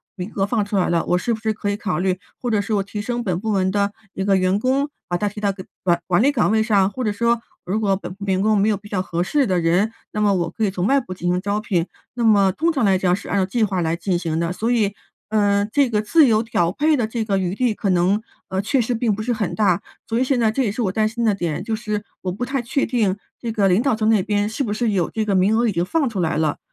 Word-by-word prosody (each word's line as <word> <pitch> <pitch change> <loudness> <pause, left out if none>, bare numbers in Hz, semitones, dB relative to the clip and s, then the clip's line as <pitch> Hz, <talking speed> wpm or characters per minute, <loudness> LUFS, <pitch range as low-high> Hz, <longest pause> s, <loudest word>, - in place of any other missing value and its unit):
名 185 +2 -6
额 195 -1 +1
放 215 -2 0
出 205 0 -4
来 185 - +2
了， 170 -1 +1
我 180 - +2
是 235 +5 -1
不 - - -11
是 220 -1 -1
可 205 -1 -3
以 205 - -1
考 180 -7 -2
虑， 185 0 0 0.2
或 245 - -2
者 215 -2 +2
是 215 - -3
我 200 - +2
提 205 +1 -6
升 240 +1 -3
本 180 -3 -1
部 220 +1 -2
门 190 -2 +1
的 200 +1 +1 0.2
一 190 - -3
个 195 -1 +3
员 185 +1 +2
工， 270 +5 +1 0.2
把 175 - -1
他 205 +1 -1
提 210 - -9
到 200 -1 +1
个 190 -1 -9 0.2
管 175 -2 +2
管 180 +3 +3
理 285 - +4
岗 235 -7 +1
位 220 0 +3
上， 200 -3 +3
或 255 +4 -4
者 210 - +1
说 235 +2 +1 0.2
如 200 +5 -1
果 200 -3 +2
本 185 -1 -7
部 200 +1 -10
员 190 -1 +1
工 215 +1 +3
没 205 +2 +3
有 205 - +1
比 205 - -14
较 200 -3 -1
合 175 -1 -2
适 275 +4 +1
的 180 -2 +1
人， 180 +7 +2 0.2
那 210 - -2
么 205 -1 +3
我 170 -2 -1
可 225 - -3
以 205 - +3
从 185 -1 -2
外 275 +4 +4
部 185 -6 -7
进 175 0 -1
行 180 +1 0
招 205 +1 -1
聘， 185 -6 -1 0.3
那 240 -1 -3
么 200 -4 +5
通 330 - 0
常 265 -8 +1
来 190 -1 +4
讲 180 -1 +2
是 200 - -9
按 200 - 0
照 190 - +2
计 225 +3 0
划 190 -4 0
来 165 0 0
进 175 0 -1
行 165 -2 -2
的， 170 +1 -1
所 225 +5 -2
以， 210 -4 +2 0.4
呃， 205 -1 +2
这 280 -2 +3
个 210 -2 +1
自 310 +4 +5
由 220 0 +3
调 175 -6 0
配 300 +7 +2
的 235 -5 0
这 225 -1 -3
个 195 -2 +1
余 185 +1 -2
地 245 -2 +1
可 200 - -2
能， 185 +4 +2 0.3
呃， 190 +1 -1
确 255 +6 +1
实 240 +2 -1
并 225 -3 0
不 215 - -4
是 240 +1 0
很 210 -5 -2
大。 195 -5 +2 0.3
所 230 +1 0
以 - - +3
现 260 -1 +1
在 220 -2 +3
这 270 - -1
也 205 - 0
是 240 - -3
我 190 - 0
担 215 +1 +1
心 235 0 -2
的 210 - +4
点， 170 -3 -3
就 220 +1 -2
是 210 -2 -3 0.2
我 185 - -2
不 245 +7 -3
太 270 -1 -1
确 260 +4 0
定 215 -5 0 0.2
这 230 -2 -3
个 205 -3 +2
领 190 +5 +3
导 265 -4 +2
层 220 0 +1
那 215 -4 +4
边 205 +1 0
是 220 +5 -2
不 210 -3 -2
是 225 0 0
有 185 -4 0
这 220 - -2
个 200 - 0
名 195 +4 +3
额 235 0 +2
已 - - +1
经 170 -1 0
放 300 - +1
出 200 -4 -4
来 160 -2 0
了， 155 -2 0
205 Hz, 330 characters per minute, -21 LUFS, 185-225 Hz, 0.4 s, 么